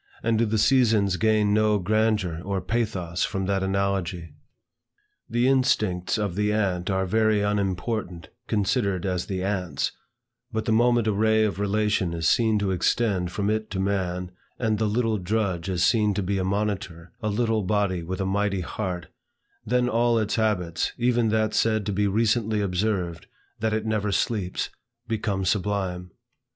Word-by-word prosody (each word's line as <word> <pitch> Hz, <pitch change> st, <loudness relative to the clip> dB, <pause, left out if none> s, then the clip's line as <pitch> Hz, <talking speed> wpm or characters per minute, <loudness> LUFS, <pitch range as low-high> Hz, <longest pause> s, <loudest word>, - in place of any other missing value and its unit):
And 115 Hz, -1 st, +1 dB
do 115 Hz, -, +2 dB
the 110 Hz, +1 st, 0 dB
seasons 110 Hz, -5 st, +3 dB
gain 110 Hz, -1 st, +2 dB
no 105 Hz, 0 st, +3 dB
grandeur 105 Hz, -3 st, 0 dB
or 100 Hz, 0 st, -2 dB
pathos 95 Hz, -6 st, -2 dB
from 95 Hz, -2 st, -1 dB
that 95 Hz, 0 st, 0 dB
analogy? 95 Hz, -4 st, -1 dB, 1.0 s
The 120 Hz, +2 st, +2 dB
instincts 110 Hz, -10 st, +1 dB
of 105 Hz, -4 st, -1 dB
the 105 Hz, +2 st, 0 dB
ant 95 Hz, -4 st, 0 dB
are 95 Hz, 0 st, +1 dB
very 110 Hz, +1 st, +2 dB
unimportant, 100 Hz, -3 st, -2 dB, 0.2 s
considered 100 Hz, -3 st, 0 dB
as 90 Hz, -2 st, -2 dB
the 95 Hz, -2 st, -3 dB
ant's; 95 Hz, -3 st, -1 dB, 0.6 s
but 110 Hz, 0 st, -2 dB
the -, -, 0 dB
moment 120 Hz, +1 st, +3 dB
a 110 Hz, -, +2 dB
ray 110 Hz, +1 st, +3 dB
of 105 Hz, -2 st, -1 dB
relation 105 Hz, -3 st, 0 dB
is 80 Hz, -1 st, 0 dB
seen 110 Hz, -2 st, +3 dB
to 100 Hz, -2 st, 0 dB
extend 95 Hz, -1 st, +1 dB
from 100 Hz, +1 st, -2 dB
it 110 Hz, 0 st, -2 dB
to 95 Hz, -, -4 dB
man, 90 Hz, -2 st, -1 dB, 0.3 s
and 110 Hz, -3 st, 0 dB
the 110 Hz, -, +1 dB
little 110 Hz, -1 st, 0 dB
drudge 95 Hz, -2 st, -1 dB
is 90 Hz, -2 st, 0 dB
seen 105 Hz, -3 st, +3 dB
to 100 Hz, -, -1 dB
be 95 Hz, +1 st, -1 dB
a -, -, 0 dB
monitor, 95 Hz, -4 st, -3 dB
a 110 Hz, -, -1 dB
little 110 Hz, +1 st, +1 dB
body 100 Hz, -2 st, 0 dB
with 90 Hz, +3 st, -5 dB
a 95 Hz, -, -1 dB
mighty 100 Hz, 0 st, 0 dB
heart, 90 Hz, -1 st, -4 dB, 0.6 s
then 125 Hz, +2 st, +1 dB
all 120 Hz, 0 st, +2 dB
its 110 Hz, -2 st, 0 dB
habits, 90 Hz, -7 st, 0 dB
even 120 Hz, -1 st, +2 dB
that 110 Hz, 0 st, +1 dB
said 110 Hz, -2 st, +1 dB
to 105 Hz, -, -1 dB
be 100 Hz, +1 st, +1 dB
recently 110 Hz, +1 st, +1 dB
observed, 90 Hz, -3 st, -1 dB, 0.3 s
that 110 Hz, 0 st, 0 dB
it 110 Hz, 0 st, -1 dB
never 105 Hz, -2 st, 0 dB
sleeps, 100 Hz, -2 st, -1 dB, 0.4 s
become 105 Hz, -4 st, -1 dB
sublime. 95 Hz, -2 st, -1 dB
105 Hz, 165 wpm, -25 LUFS, 95-110 Hz, 1.0 s, seasons